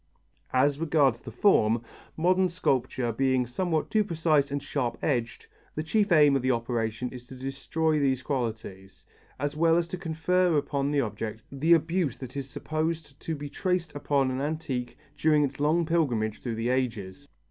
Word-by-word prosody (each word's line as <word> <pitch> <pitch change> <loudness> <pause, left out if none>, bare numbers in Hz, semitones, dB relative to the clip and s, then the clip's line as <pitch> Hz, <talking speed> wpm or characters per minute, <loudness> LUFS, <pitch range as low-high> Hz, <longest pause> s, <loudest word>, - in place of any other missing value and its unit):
As 140 +2 +2
regards 145 -7 +2
the - - -8
form, 115 - +3 0.3
modern 185 +3 +3
sculpture 130 -7 0
being 130 +1 +1
somewhat 160 +6 -1
too 215 -1 +3
precise 160 -6 +1
and 145 +1 -2
sharp 125 -5 -2
edged, 120 -6 -1 0.3
the 155 - -2
chief 205 +5 +1
aim 150 -4 +6
of 135 - +1
the 130 - 0
operation 115 -1 -1
is 125 -1 -10
to 130 - -10
destroy 140 +4 -1
these 130 -2 +1
qualities, 110 -8 -4 0.3
as 145 +2 -2
well 165 +1 +4
as 170 -1 0
to 185 - -5
confer 175 0 +1
upon 140 -1 -1
the 145 -1 +2
object 110 -1 -5
the 150 +5 +3
abuse 165 -3 +1
that 130 0 -9
is 140 -1 -4
supposed 155 0 -3
to 160 - -3
be 145 0 -6
traced 180 +1 -2
upon 140 -2 +1
an 130 +1 -2
antique 140 -5 -3 0.2
during 155 -2 +3
its 140 - -3
long 160 +4 +2
pilgrimage 125 -10 0
through 120 -3 -3
the 115 +2 -1
ages. 125 -1 -2
140 Hz, 170 wpm, -27 LUFS, 125-160 Hz, 0.3 s, aim